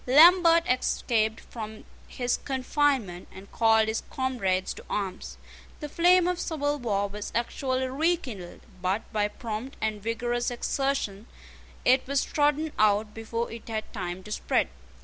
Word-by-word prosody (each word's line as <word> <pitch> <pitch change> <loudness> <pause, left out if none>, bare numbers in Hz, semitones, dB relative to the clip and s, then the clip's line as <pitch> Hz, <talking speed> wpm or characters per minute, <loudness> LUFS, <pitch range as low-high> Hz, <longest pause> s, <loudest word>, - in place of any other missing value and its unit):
Lambert 335 +4 +7
escaped 225 -3 +1
from 220 -2 -8 0.2
his 245 -1 -1
confinement, 265 - 0
and 190 +1 -12
called 220 -1 +4
his 220 0 -1
comrades 195 -8 -1
to - - -12
arms. 195 -3 -4 0.4
The 300 - -5
flame 355 +3 +4
of 360 -1 0
civil 290 -3 -1
war 205 -5 0
was 205 +1 -7
actually 260 +2 -1
rekindled; 265 - -2 0.2
but 190 +4 0
by 210 -1 +2
prompt 225 +4 -6
and 215 -1 -2
vigorous 240 +2 -1
exertion 245 -4 -2 0.6
it 255 +1 +4
was 280 0 +1
trodden 295 +1 +1
out 210 0 +3
before 230 +1 -3
it 230 0 -9
had 220 -1 -4
time 180 -2 -4
to 210 - -10
spread. - - +1
235 Hz, 140 wpm, -27 LUFS, 210-275 Hz, 0.6 s, Lambert